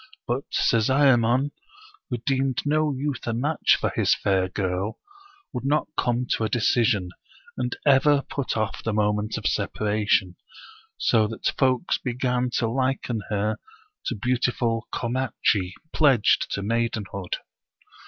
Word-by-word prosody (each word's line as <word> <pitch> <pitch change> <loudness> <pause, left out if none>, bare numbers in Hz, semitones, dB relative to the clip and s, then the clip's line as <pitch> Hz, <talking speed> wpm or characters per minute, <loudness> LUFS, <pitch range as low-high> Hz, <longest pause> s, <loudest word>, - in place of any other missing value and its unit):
But 125 +3 -2
Sezaemon, 130 +2 +3 0.6
who 125 - -1
deemed 135 -1 0
no 155 +1 +2
youth 140 -2 -3
a 120 - 0
match 145 +7 +2
for - - 0
his - - +3
fair 95 -2 +1
girl, 95 +2 -2 0.5
would 125 - -4
not 150 +3 +1
come 120 +1 0
to - - +1
a 110 - 0
de 120 - 0
cision, 110 -5 +2 0.5
and 125 -1 -2
ever 140 0 +5
put 140 -4 -3
off 110 -1 -2
the 110 - -1
moment 105 0 0
of 110 - -7
separation, 105 -2 0 0.6
so 110 -3 +3
that 110 +1 -2
folks 130 +4 +1
began 125 0 -1
to 115 - +1
liken 130 -2 -1
her 105 +1 0 0.5
to 125 - -1
beautiful 120 0 0
Komatchi; 115 -6 0 0.2
pledged 135 -8 +4
to 100 - -2
maidenhood. 105 -4 -2
120 Hz, 135 wpm, -25 LUFS, 105-130 Hz, 0.6 s, ever